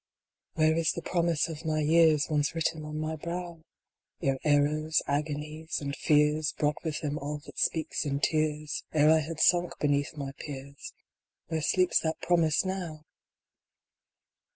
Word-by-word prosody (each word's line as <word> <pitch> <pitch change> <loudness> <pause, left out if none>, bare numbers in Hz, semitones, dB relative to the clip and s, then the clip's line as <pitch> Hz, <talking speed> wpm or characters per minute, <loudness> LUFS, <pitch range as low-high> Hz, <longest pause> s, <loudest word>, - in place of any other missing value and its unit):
"INHERE 155 0 +3
is 165 -1 +2
the 170 - -6
promise 170 -3 +1
of 160 -1 -7
my 155 -1 0
years; 155 -1 +4
Once 150 0 0
written 165 -1 -1
on 150 0 -5
my 155 +1 -2
brow? 170 +1 -6 0.6
Ere 135 -1 +1
errors, 150 +1 +2
agonies 150 +2 -3
and 140 -1 -4
fears 150 0 +2
Brought 150 -1 0
with 160 -3 -3
them 150 0 -2
all 145 +2 -4
that 135 -2 -9
speaks 160 -1 0
in 140 -2 -1
tears, 155 -1 0
Ere 155 0 +5
I 160 - +5
had 155 +1 -5
sunk 175 +1 +3
beneath 145 +1 0
my 140 -1 -4
peers; 140 -1 -8 0.6
Where 160 -1 -1
sleeps 180 +4 +3
that 160 0 -2
promise 165 -1 +2
now 175 -5 -4
155 Hz, 155 wpm, -29 LUFS, 150-160 Hz, 0.6 s, Ere